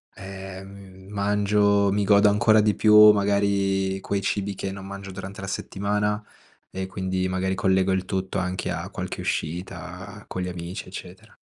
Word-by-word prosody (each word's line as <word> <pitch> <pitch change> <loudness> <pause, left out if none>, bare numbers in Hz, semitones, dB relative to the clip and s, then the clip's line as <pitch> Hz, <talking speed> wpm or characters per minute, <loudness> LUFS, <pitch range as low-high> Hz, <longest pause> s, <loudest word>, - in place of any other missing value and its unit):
ehm, 95 0 -10
mangio, 100 0 +2
mi 105 0 +1
godo 100 +1 +5
ancora 110 +1 +4
di 105 -1 +3
più 105 0 +8
magari 100 -1 +1
quei 100 -1 -2
cibi 100 0 -1
che 95 +1 -4
non 95 -1 -8
mangio 100 0 -8
durante 95 +2 -8
la 95 - -6
settimana 105 +2 -1 0.6
e 95 0 -2
quindi 95 0 -2
magari 95 +1 -1
collego 95 0 +2
il 95 0 0
tutto 95 +1 -3
anche 90 0 -2
a - - -4
qualche - - -5
uscita 90 +4 -5
con 95 - -4
gli 90 - -3
amici, 90 +1 -6
eccetera. 95 +3 -10
95 Hz, 155 wpm, -24 LUFS, 95-100 Hz, 0.6 s, più